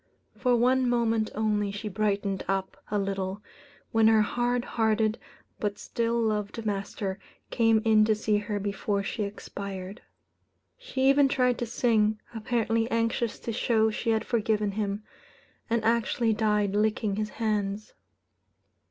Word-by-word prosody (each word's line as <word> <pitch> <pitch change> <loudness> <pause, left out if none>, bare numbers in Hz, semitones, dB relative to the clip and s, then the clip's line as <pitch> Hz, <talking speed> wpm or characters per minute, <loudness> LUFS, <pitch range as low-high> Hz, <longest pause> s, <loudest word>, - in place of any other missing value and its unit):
For 250 -2 +2
one 250 +1 +3
moment 230 -2 +1
only 210 -1 +1
she 205 +2 -5
brightened 200 -1 -1
up 195 -1 -1
a 210 - 0
little, 195 0 -2 0.5
when 225 -1 +4
her 220 -1 +5
hard 245 +2 0
hearted, 220 -1 +1 0.4
but 205 -1 -2
still 235 0 -1
loved 215 0 -1
master 195 -1 -3 0.3
came 225 -2 +3
in 215 -1 +5
to 215 0 +3
see 210 0 +1
her 205 0 -3
before 200 0 -1
she 215 - -4
expired. 200 0 -6 0.7
She - - -1
even 275 0 +5
tried 250 -2 +1
to 240 - -2
sing, 220 -2 +2
apparently 225 0 0
anxious 230 0 0
to 230 - -4
show 220 -1 +2
she 230 +2 -3
had 220 -1 +1
forgiven 215 -3 0
him; 205 0 -3 0.7
and 230 -1 +1
actually 230 0 +2
died 210 -2 +1
licking 210 -1 +1
his 215 0 -1
hands. 210 -2 -2
215 Hz, 140 wpm, -27 LUFS, 205-230 Hz, 0.7 s, her